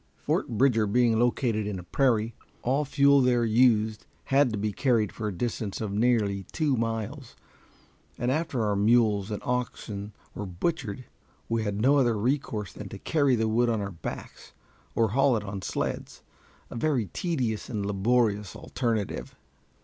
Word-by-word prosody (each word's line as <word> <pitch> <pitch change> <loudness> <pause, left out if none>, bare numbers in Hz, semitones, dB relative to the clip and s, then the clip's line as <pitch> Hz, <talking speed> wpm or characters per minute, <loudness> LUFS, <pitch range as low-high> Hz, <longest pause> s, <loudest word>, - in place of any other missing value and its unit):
Fort - - -1
Bridger 115 -2 +3
being 115 +1 +3
located 120 -3 +1
in 105 -2 -3
a 90 - -7
prairie, 115 +2 +1 0.3
all 135 +4 +1
fuel 140 0 +4
there 125 -2 +3
used 110 -2 +3 0.2
had 135 -2 +3
to 105 - -2
be 105 +1 -1
carried 115 -3 +1
for 110 - -4
a - - -1
distance 105 +1 -3
of 110 -3 -3
nearly 105 -3 +2
two 150 -5 +1
miles, 115 +3 -3 0.8
and 120 +2 0
after 145 -6 -1
our 105 -1 +1
mules 105 -1 +3
and 105 - -4
oxen 110 -4 -3 0.2
were 105 - -5
butchered, 125 - -3 0.4
we 115 0 0
had 105 -1 -2
no 135 +6 +4
other 120 -4 +2
recourse 110 -3 -1
than 100 -2 -8
to 100 - -8
carry 140 +3 +2
the 110 -1 0
wood 120 +2 +2
on 115 -2 +1
our 100 -1 -3
backs 85 -4 -8 0.4
or 115 -2 +3
haul 130 +2 +3
it 105 - -4
on 100 -1 -5
sleds - - -4 0.5
a - - -7
very 125 -2 +1
tedious 130 - -2
and 105 -4 -2
laborious 105 -1 +1
alternative. 115 -5 -3
115 Hz, 165 wpm, -27 LUFS, 105-125 Hz, 0.8 s, fuel